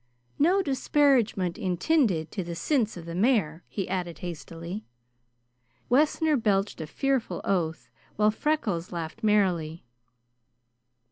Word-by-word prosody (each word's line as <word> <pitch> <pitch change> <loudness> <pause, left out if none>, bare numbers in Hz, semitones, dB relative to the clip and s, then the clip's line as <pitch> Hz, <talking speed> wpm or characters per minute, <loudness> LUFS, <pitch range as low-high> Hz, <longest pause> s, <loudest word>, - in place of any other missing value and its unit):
No 365 +7 +4
disparagement 265 - +2
intinded 185 - +1
to 195 - -3
the 170 0 -6
sinse 220 - 0
of 165 - -8
the 170 - -6
mare!" 180 -6 +1
he 195 - -4
added 180 -2 -3
hastily. 170 +3 -7 1.0
Wessner 300 +4 +3
belched 205 -5 0
a 155 - -5
fearful 270 - -1
oath, 165 -4 -1 0.2
while 210 0 +3
Freckles 210 - -1
laughed 170 +5 -5
merrily. 180 - +1
195 Hz, 115 wpm, -27 LUFS, 170-255 Hz, 1.0 s, No